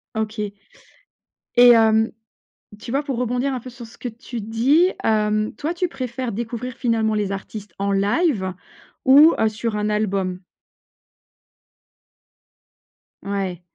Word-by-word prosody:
OK. 215 -1 -3 1.1
Et 245 0 +9
hem, 225 -1 +5 0.7
tu 230 - -8
vois, 275 +4 0
pour 270 -5 -3
rebondir 250 +2 -1
un 255 - -4
peu 255 - -10
sur 240 -1 -11
ce 225 - -17
que 250 - -4
tu 235 +1 -8
dis, 255 - +3
hem, 215 -1 +1
toi, 310 +10 -3
tu 360 +1 -1
préfères 255 -3 -4
découvrir 235 +3 -5
finalement 225 -4 0
les 205 -2 -1
artistes 195 -1 -7
en 200 0 0
live 200 - +1 0.5
ou, 290 +5 +7
heu, 220 - +3
sur 215 0 -3
un 210 0 -1
album? 195 -4 -1 2.8
Ouais. 195 -3 -3
225 Hz, 130 wpm, -21 LUFS, 210-250 Hz, 2.8 s, Et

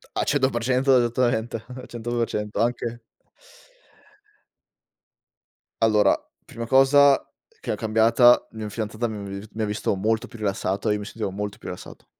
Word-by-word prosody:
A - - +1
100% 130 -1 +2
esattamente. 120 -1 0
A 125 0 -9
100% 115 -3 -3
anche 120 0 -2 2.8
Allora, 105 -3 +4 0.3
prima 115 0 -7
cosa 135 +2 +5 0.4
che - - -4
è - - -2
cambiata: 115 +3 +4
mia 110 -1 -5
fidanzata 110 +2 -3
mi 110 -1 -6
avevi 100 0 -6
vi 110 - -12
mi 110 - -4
ha - - +1
visto 105 0 -1
molto 110 +5 -1
più 115 - -13
rilassato 100 -1 -1
e - - +3
io 105 - -2
mi 100 - -7
sentivo 105 -2 -4
molto 100 +1 -5
più - - -11
rilassato. - - -9
115 Hz, 150 wpm, -24 LUFS, 105-120 Hz, 2.8 s, cosa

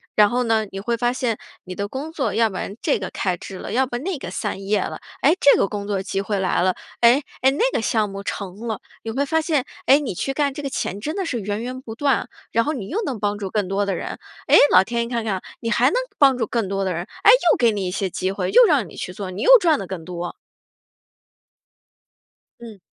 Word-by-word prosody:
然 210 -1 +6
后 250 +2 0
呢 225 -2 +1
你 195 - -5
会 235 +3 -1
发 240 +1 +1
现 240 -4 -1 0.3
你 185 - -7
的 200 +2 -3
工 275 +8 -6
作 300 -5 -2
要 225 -1 +3
不 190 - -6
然 200 - -5
这 - - +1
个 185 - -4
开 185 -2 -2
枝 190 - -9
了， - - -7
要 260 +4 +2
不 240 - -3
那 345 +5 -3
个 180 - -7
散 190 +1 -4
叶 205 0 +1
了， - - -4 0.2
哎， 300 - +5
这 285 - +6
个 - - +3
工 205 -1 -5
作 195 -2 -1
机 195 - -2
会 200 +1 -2
来 185 - +1
了， 185 0 +2 0.2
哎， 240 +4 +5 0.2
哎， 265 - +5
那 280 - -4
个 - - 0
项 220 -2 +1
目 195 0 -6
成 200 +2 -6
了。 220 -2 -3 0.2
你 225 - -4
会 275 +5 0
发 320 +3 +1
现， 310 -4 0 0.2
哎， 270 - +7
你 285 -9 -3
去 270 +9 -2
干 280 -1 0
这 290 - -6
个 280 - -3
钱 200 -6 -3
真 305 - -4
的 390 -2 -2
是 250 -8 -2
源 205 +1 -3
源 255 +1 -5
不 225 -4 -8
断 280 +2 +2
啊， - - -6 0.2
然 230 +1 +2
后 305 - 0
你 220 -10 -6
又 400 - -1
能 265 -8 -3
帮 205 0 -1
助 200 -2 -4
更 205 -2 -1
多 200 +1 0
的 200 - -1
人。 - - -5 0.3
诶， - - +7
老 185 - +7
天 235 +3 -1
一 - - -6
看 235 -1 -2
看 215 -3 -1
啊， 185 - -5 0.2
你 230 - -2
还 - - +3
能 - - -2 0.2
帮 270 -3 +5
助 230 - 0
更 225 -1 -1
多 195 0 -1
的 190 - -1
人， 170 +1 -3 0.2
哎， - - +9 0.2
又 - - 0
给 235 -2 +4
你 200 -3 -2
一 - - -3
些 195 0 -2
机 185 +1 -2
会， 190 -2 -2
又 - - +8
让 275 - +2
你 - - -13
去 180 - -5
做， 190 -1 -6
你 185 - -6
又 - - +8
赚 335 - +2
得 195 - -6
更 185 -3 -6
多。 175 +1 -5 2.3
嗯。 225 -4 -10
220 Hz, 285 characters per minute, -22 LUFS, 195-265 Hz, 2.3 s, 哎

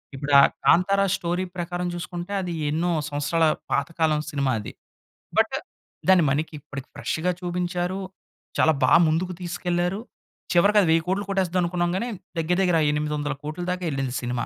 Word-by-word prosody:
ఇప్పుడు 140 +1 -4
ఆ - - +8 0.2
'కాంతార' 195 +3 +4
స్టోరీ 175 0 -1
ప్రకారం 175 +1 -3
చూసుకుంటే 175 +2 -5
అది 175 -2 -4 0.2
ఎన్నో 170 +3 0 0.2
సంవత్సరాల 145 +3 +1 0.3
పాతకాలం 155 +1 +1
సినిమా 140 -2 0
అది. 105 - -7 0.7
బట్ - - +3 0.5
దాన్ని 185 -3 +6
మనకి 155 +3 -1
ఇప్పటికి 135 0 -9
ఫ్రెష్‌గా 160 +4 -1
చూపించారు 180 +1 -2 0.6
చాలా 160 - +4
బా 130 - +4
ముందుకు 175 +4 0
తీసుకెళ్లారు 175 +2 -1 0.5
చివరికి 200 +4 +4
అది 185 - +3
1,000,00,00,000 180 +5 +1
కొట్టేస్తాది 185 -2 +1
అనుకున్నాం 175 0 0
గాని 235 +6 -2 0.3
దగ్గర 165 +2 +1
దగ్గర 180 -2 +3
ఆ - - +3
800,00,00,000 150 +2 -3
దాకా 180 0 -3
ఎళ్ళింది 135 -2 -2
సినిమా. 120 0 -2
175 Hz, 145 wpm, -24 LUFS, 150-180 Hz, 0.7 s, ఆ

